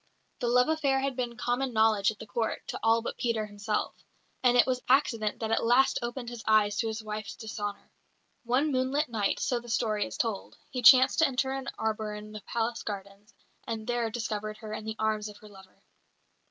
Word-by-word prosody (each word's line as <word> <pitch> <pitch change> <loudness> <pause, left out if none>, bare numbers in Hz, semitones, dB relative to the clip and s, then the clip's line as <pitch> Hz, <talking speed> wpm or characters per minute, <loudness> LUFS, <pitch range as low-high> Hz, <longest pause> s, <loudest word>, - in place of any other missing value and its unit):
The 245 - -1
love 250 +1 +4
affair 295 -4 +2
had 275 -1 -1
been 240 -2 -3
common 245 +3 -1
knowledge 220 -2 +4
at 220 - -5
the 220 - -9
Court 220 +1 -3
to - - -4
all 225 +1 +3
but - - -5
Peter 230 -3 0
himself, 210 0 -3 0.4
and 245 -1 +4
it 245 - +7
was 255 -1 -1
accident 235 -5 +2
that 220 -2 -2
at - - +2
last 245 +3 +4
opened 240 0 -4
his 240 -2 -8
eyes 215 -1 +4
to 225 - 0
his 220 0 -4
wife's 215 -1 -5
dishonour. 205 -2 -6 0.5
One 260 +5 +1
moonlight 265 +3 0
night, 210 -4 0
so 245 - 0
the 240 0 -12
story 215 -2 0
is - - -8
told, 225 -5 -3
he 255 -3 -3
chanced 255 +3 +7
to 320 - +6
enter 265 0 -1
an 270 0 -3
arbour 215 -1 -2
in 210 0 -9
the 215 -1 -8
palace 230 +2 -2
gardens, 200 +1 -8 0.3
and 220 -1 -4
there 240 -1 0
discovered 215 -2 -4
her 215 0 -8
in 215 - -6
the 220 0 -4
arms 215 -1 -1
of 205 - -12
her 210 - -15
lover. 190 -2 -17
225 Hz, 205 wpm, -29 LUFS, 215-250 Hz, 0.5 s, it